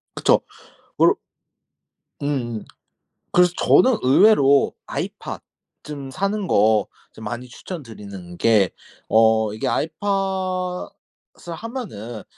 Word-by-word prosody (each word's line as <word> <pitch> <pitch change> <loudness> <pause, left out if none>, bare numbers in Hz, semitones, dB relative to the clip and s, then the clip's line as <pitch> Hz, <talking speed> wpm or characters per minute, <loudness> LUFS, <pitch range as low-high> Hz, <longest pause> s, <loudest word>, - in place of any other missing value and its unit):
그쵸. - - +3 0.6
올 - - +5 1.1
음음. 120 -6 -2 0.7
그래서 180 0 +5
저는 255 -3 +4
의외로 140 -1 +5
아이팟 - - -5 0.4
좀 140 -3 -7
사는 200 +4 -2
거 110 -2 +3 0.3
좀 110 - -12
많이 120 +1 -5
추천드리는 105 - -9
게, 105 -5 +3 0.4
어 110 -1 +3
이게 110 - -2
아이팟을 185 +1 -2 0.7
하면은 160 - -7
140 Hz, 190 characters per minute, -22 LUFS, 110-185 Hz, 1.1 s, 올